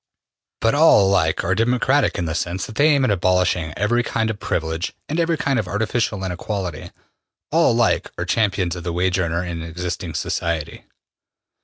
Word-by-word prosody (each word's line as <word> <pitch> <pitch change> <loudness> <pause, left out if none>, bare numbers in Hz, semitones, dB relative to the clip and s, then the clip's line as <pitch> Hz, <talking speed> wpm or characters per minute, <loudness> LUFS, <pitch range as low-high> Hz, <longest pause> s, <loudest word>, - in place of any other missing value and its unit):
But 115 - +3
all 145 -9 +6
alike 85 -5 +2
are 95 - +1
democratic 125 +6 +2
in 85 - -1
the 80 - -2
sense 85 +2 -2
that - - -9
they 145 +7 +3
aim 140 -3 +3
at 110 - +2
abolishing 90 -3 +1
every 115 +5 +2
kind 110 -2 -1
of 105 - -8
privilege 80 -1 -2
and 155 +3 -2
every 165 -1 +1
kind 135 -6 0
of 105 - -3
artificial 105 +1 -1
inequality: 90 -2 -4 0.6
all - - +4
alike - - +1
are - - -2
champions 95 -5 0
of 85 - -7
the 85 -1 -3
wage 90 +1 +1
earner 85 0 -1
in 85 -2 -5
existing 85 0 -5
society. 85 -3 -3
95 Hz, 175 wpm, -21 LUFS, 85-115 Hz, 0.6 s, all